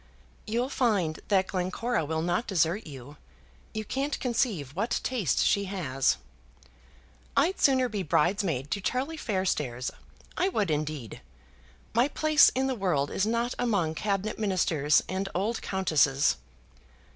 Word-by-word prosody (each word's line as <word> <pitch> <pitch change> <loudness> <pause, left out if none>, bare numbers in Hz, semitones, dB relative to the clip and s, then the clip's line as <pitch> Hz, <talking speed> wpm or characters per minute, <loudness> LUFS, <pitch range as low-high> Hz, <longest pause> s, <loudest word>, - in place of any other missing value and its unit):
"You'll 235 +4 0
find 205 - +1
that 190 -2 +3
Glencora 190 +4 -1
will 160 +1 -2
not 175 +7 0
desert 175 +1 +1
you. 140 0 -10 0.5
You 215 -1 -4
can't 275 +5 -2
conceive 215 - -1
what 225 +6 0
taste 220 - +1
she 200 0 +2
has." 155 -9 0 1.2
"I'd 330 +7 +2
sooner 260 -2 +4
be 210 -4 -3
bridesmaid 165 - 0
to 200 - -1
Charlie 265 +9 -1
Fairstairs. 180 - -1 0.4
I 375 - +1
would 205 - 0
indeed. 150 -6 -3 0.7
My 240 +4 +4
place 305 0 +5
in 260 +1 +1
the 265 - 0
world 180 - 0
is 200 - 0
not 235 +2 0
among 200 -10 +1
Cabinet 200 +4 -2
Ministers 170 -8 +2
and 190 +1 -2
old 210 +6 -1
countesses." 150 - +2
195 Hz, 135 wpm, -28 LUFS, 155-235 Hz, 1.2 s, place